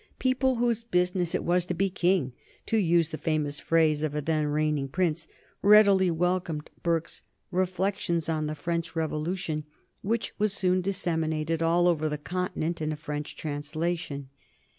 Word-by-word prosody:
People 260 0 +2
whose 235 -1 0
business 180 -4 +1
it - - -1
was 175 +1 +2
to 180 - -2
be 195 +3 +2
king, 175 - +1 0.3
to 225 - +1
use 170 -4 +3
the 155 - -5
famous 150 -2 -1
phrase 160 -2 +2
of 155 -1 -2
a 150 - 0
then 155 -1 +1
reigning 150 -1 0
prince, 160 +1 -1 0.3
readily 200 -3 +6
welcomed 175 -2 -1
Burke's 170 -1 -1 0.3
"Reflexions 185 -2 0
on 155 -2 -1
the 155 - -3
French 170 +2 -3
Revolution," 160 0 -2 0.4
which 225 +3 -1
was 210 -1 +2
soon 185 -1 +2
disseminated 165 -4 -1
all 170 +2 +3
over 155 -3 +2
the 150 - -2
Continent 170 0 -3
in 155 0 -1
a - - -2
French 150 0 -5
translation. 150 -1 -3
165 Hz, 155 wpm, -28 LUFS, 155-185 Hz, 0.4 s, readily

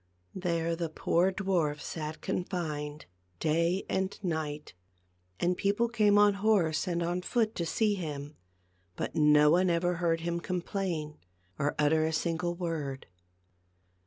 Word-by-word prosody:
There 170 -2 -1
the 165 -1 -3
poor 170 +3 +2
dwarf 180 -7 0
sat 155 0 -5
confined, 155 -5 -3 0.3
day 170 +4 +1
and 190 0 -1
night. 155 - -3 0.7
And 180 +1 +1
people 205 +5 +1
came 210 -3 +4
on 205 0 +6
horse 190 -7 +2
and 170 -1 0
on 175 +2 -1
foot 220 +3 0
to 170 - -1
see 215 +4 +2
him, 150 -5 -5 0.6
but - - -4
no 150 -1 +6
one 180 +2 +4
ever 175 +1 +1
heard 165 -1 +1
him 170 0 -1
complain 175 -3 -3 0.4
or 145 +1 0
utter 150 +1 +3
a 160 0 0
sin 165 +1 0
gle 175 0 -2
word. 160 -6 -4
170 Hz, 140 wpm, -30 LUFS, 155-185 Hz, 0.7 s, on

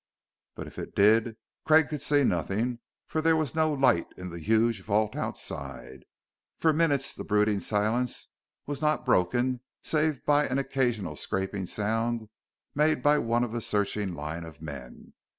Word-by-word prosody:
But - - -6
if - - -10
it - - -7
did, 110 +2 +4 0.3
Craig 155 -1 +5
could 150 -2 -4
see 145 -1 +3
nothing, 110 +5 0 0.3
for 155 - -2
there 165 0 +4
was 155 -3 -1
no 160 0 +2
light 130 - +3
in 90 -1 -7
the 85 - -7
huge 110 +3 +2
vault 105 +2 0
outside. 65 -1 -6 0.5
For 160 -1 +3
minutes 145 -4 +1
the - - -7
brooding 105 0 +2
silence 110 +6 -1 0.4
was 145 0 -5
not 155 0 +1
broken, 125 +7 +2 0.2
save 155 -3 0
by 145 0 +3
an 130 - -1
occasional 130 -8 -1
scraping 95 0 -3
sound 115 +2 -1 0.4
made 150 -3 +2
by 145 0 +5
one 115 0 +1
of 120 - -3
the 120 0 -3
searching 105 -3 -1
line 75 +3 -5
of 80 -2 -11
men. 70 -6 -9
115 Hz, 160 wpm, -28 LUFS, 100-145 Hz, 0.5 s, Craig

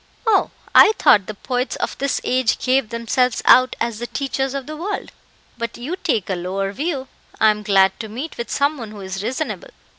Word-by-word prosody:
"Oh, 440 -3 +3 0.2
I 435 - +8
thought 200 -3 +5
the 215 - -6
poets 250 +4 -2
of - - -3
this 275 -1 0
age 255 -3 +1
gave 255 -3 +1
themselves 235 +2 0
out 255 0 +6
as 230 -2 -2
the 240 - -4
teachers 270 0 -2
of 275 -2 -4
the 310 - -7
world; 380 +7 -4 0.5
but 235 0 -4
you 280 +9 -4
take 305 - -1
a 195 - -1
lower 190 +2 -3
view. 275 +2 -3 0.3
I 220 - +6
am 210 0 -4
glad 195 -2 +3
to 220 - -6
meet 265 +9 -6
with 235 - -5
some 285 +1 0
one 225 -3 -6
who 210 -1 -10
is 190 0 -5
reasonable. 295 - -4
245 Hz, 205 wpm, -20 LUFS, 210-275 Hz, 0.5 s, I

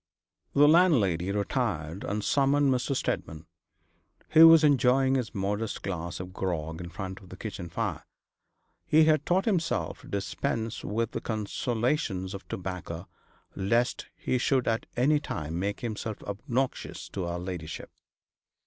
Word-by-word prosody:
The 145 +1 +7
landlady 115 - +4
retired, 100 - -2
and 105 +1 -2
summoned 140 +2 +3
Mr. 130 +2 -1
Steadman, 80 -9 -3 0.8
who 160 +1 +9
was 165 -1 +8
enjoying 135 -2 +4
his 125 -3 -1
modest 100 +3 -2
glass 85 -3 -4
of 90 0 -7
grog 80 -3 -3
in 85 - -6
front 95 0 -6
of 95 - -16
the 95 - -10
kitchen 95 -4 -6
fire. - - -3 0.8
He 155 +1 +6
had 155 -2 +3
taught 185 +2 +2
himself 185 -7 0
to - - -14
dispense 110 +3 -3
with 115 +2 -1
the - - -4
consolations 110 - -1
of 100 - -8
tobacco, 90 -1 -5 0.5
lest 115 +6 0
he 125 - -1
should 130 0 +1
at 115 0 0
any 145 +5 +4
time 80 - -4
make 100 +2 -2
himself 110 -2 -4
obnoxious 125 +6 -3
to 95 - -4
her 85 0 -3
ladyship. 90 -3 -6
110 Hz, 140 wpm, -28 LUFS, 95-135 Hz, 0.8 s, who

